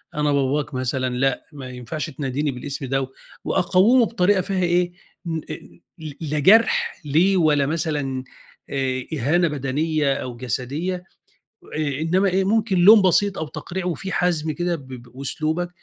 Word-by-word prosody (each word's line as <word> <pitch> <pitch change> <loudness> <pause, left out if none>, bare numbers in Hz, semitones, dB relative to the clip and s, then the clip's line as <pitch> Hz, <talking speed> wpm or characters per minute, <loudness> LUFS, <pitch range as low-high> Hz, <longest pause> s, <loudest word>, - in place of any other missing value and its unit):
أنا 150 -1 +1
باباك 140 +1 0
مثلًا 130 0 -1
لأ 135 0 0
ما 135 -3 -8
ينفعش 125 +6 -5
تناديني 140 0 -2
بالاسم 135 +2 -6
ده 135 +1 0
و 130 - -3 0.4
وأقوّمه 195 +7 +4
بطريقة 200 -3 +2
فيها 185 0 -1
إيه 175 0 +2 0.3
ن 165 -1 -2
أ - - -3 0.5
ل 155 -3 -7
لا 150 -1 -2
جرح 215 +2 +4
ليه 175 +7 +3
ولا 150 -4 +3
مثلًا 145 -4 -2 0.5
آآ 130 -2 -2
إهانة 160 +5 +2
بدنية 145 +1 0
أو 125 -3 -5
جسدية، 140 - -3 0.7
آآ 145 -2 -1
إنّما 185 +5 +2
إيه 190 +1 +1
ممكن 210 -1 +1
لوم 205 +4 +8
بسيط 195 +2 +2
أو 160 - -3
تقريع 180 +4 -5
وفي 180 +2 -3
حزم 160 -3 0
كده 175 +1 -1
ب 135 -3 -14
بأسلوبك، 135 +7 -4
155 Hz, 150 wpm, -22 LUFS, 135-180 Hz, 0.7 s, لوم